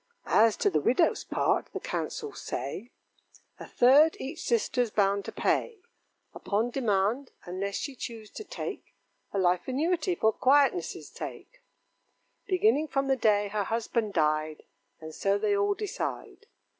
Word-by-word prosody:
As 220 0 +4
to 405 - +2
the - - +1
widow's 260 +8 +2
part, - - 0
the - - -3
counsels 435 -2 -4
say 140 - -5 0.7
A - - -8
third 285 +6 +5
each 305 +5 -6
sister's 240 +1 +1
bound 200 -1 +1
to - - -5
pay, 465 - 0 0.6
Upon 220 +4 -1
demand, 235 +1 0 0.2
unless 195 +3 -4
she 280 - -4
choose 225 -3 -8
to - - -8
take - - -7 0.4
A - - -3
life 180 -1 +1
annuity, 330 +6 0
for 220 -7 +2
quietness' 285 +6 +2
sake, - - -9 0.9
Beginning 370 -5 +2
from 275 -1 -1
the 270 - +4
day 205 -4 +2
her 205 -1 -1
husband 225 -1 -1
died, 155 -1 0 0.4
And 160 0 -9
so 200 +4 +1
they 205 0 +1
all 200 0 +1
decide. 420 +4 -5
230 Hz, 145 wpm, -28 LUFS, 200-290 Hz, 0.9 s, third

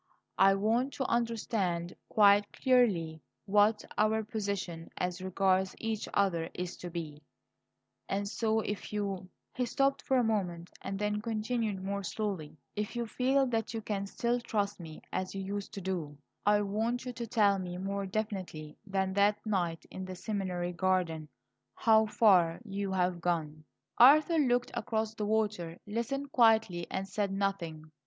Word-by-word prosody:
I 195 0 +6
want 230 +7 +1
to 265 - -2
understand 215 -8 -1 0.2
quite 205 -1 +5
clearly 190 -12 +2 0.2
what 210 +1 +3
our 220 +1 +3
position 200 -6 -4
as 180 0 -2
regards 190 0 +1
each 220 -2 -3
other 175 -5 +1
is 180 0 -4
to 175 - -7
be; 160 -3 -6 0.9
and 200 +1 -1
so, 220 +1 0
if 205 -1 -5
you 200 -3 -3
" - - -52
He 250 -1 -1
stopped 275 +2 +1
for 265 - +1
a 250 - +3
moment 180 -6 -1
and 195 0 -4
then 210 +1 -1
continued 220 -3 -2
more 200 +1 -2
slowly: 190 -6 -4 0.2
"If 210 +2 -3
you 240 0 -1
feel 265 +4 +2
that 225 -1 -1
you 225 - -2
can 200 -2 -2
still 240 +4 0
trust 205 -4 -2
me 160 -2 -10
as 185 +1 -2
you 195 - -3
used 200 +1 -4
to 200 - -5
do, 170 -6 -3 0.3
I 205 0 +5
want 225 +5 -1
you 250 - -4
to 235 -1 -5
tell 205 -4 +3
me 180 -1 -5
more 195 +1 -3
definitely 185 -7 -4
than 190 -1 0
that 205 +2 +2
night 175 -6 -1
in 190 - -6
the 185 0 -6
seminary 180 -3 -3
garden, 170 -4 0 0.5
how 220 -1 +4
far 185 -7 +4
you 200 -1 -3
have 180 -2 0
gone." 155 -3 -2 0.3
Arthur 305 +6 +7
looked 245 -3 +2
out - - -2
across 220 -1 -1
the 210 -2 -3
water, 210 -6 0
listened 260 +6 -3
quietly, 220 -8 +3
and 195 0 -3
said 200 -1 -1
nothing. 170 -6 -2
200 Hz, 160 wpm, -31 LUFS, 180-220 Hz, 0.9 s, Arthur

